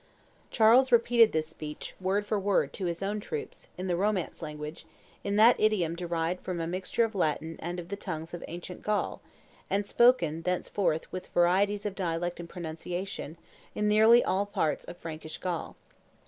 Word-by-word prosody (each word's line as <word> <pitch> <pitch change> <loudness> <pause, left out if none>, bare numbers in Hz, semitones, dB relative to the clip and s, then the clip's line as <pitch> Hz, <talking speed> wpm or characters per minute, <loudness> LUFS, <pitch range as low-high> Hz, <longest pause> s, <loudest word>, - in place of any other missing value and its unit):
Charles 240 +4 +5
repeated 235 -1 +5
this 155 0 0
speech, 150 -1 -8
word 195 +2 0
for 205 0 0
word, 200 0 +1
to 185 - -2
his 170 +2 -3
own 205 +2 -1
troops, 455 - -6
in 185 - -4
the 180 -2 0
Romance 195 -1 -1
language, 150 0 -7 0.4
in 200 0 -1
that 225 +3 +6
idiom 195 -7 +2
derived 170 0 -2
from 180 -2 -3
a 165 - -1
mixture 185 +6 0
of 225 0 -1
Latin 160 -3 -1
and 175 +2 -4
of 175 0 -8
the 200 - -2
tongues 165 -5 -6
of 175 - -6
ancient 175 +1 -7
Gaul, 210 -1 -1 0.5
and 200 +1 +1
spoken, 235 -9 +3
thenceforth, 180 -1 -1
with 185 - -6
varieties 195 +4 +2
of 205 - -2
dialect 175 -1 -2
and 170 -1 -7
pronunciation, 175 0 -5 0.4
in 210 - 0
nearly 220 +3 +6
all 200 +2 0
parts 160 -6 -1
of 175 - -9
Frankish 160 -2 -7
Gaul. 180 -3 -4
185 Hz, 175 wpm, -29 LUFS, 165-210 Hz, 0.5 s, that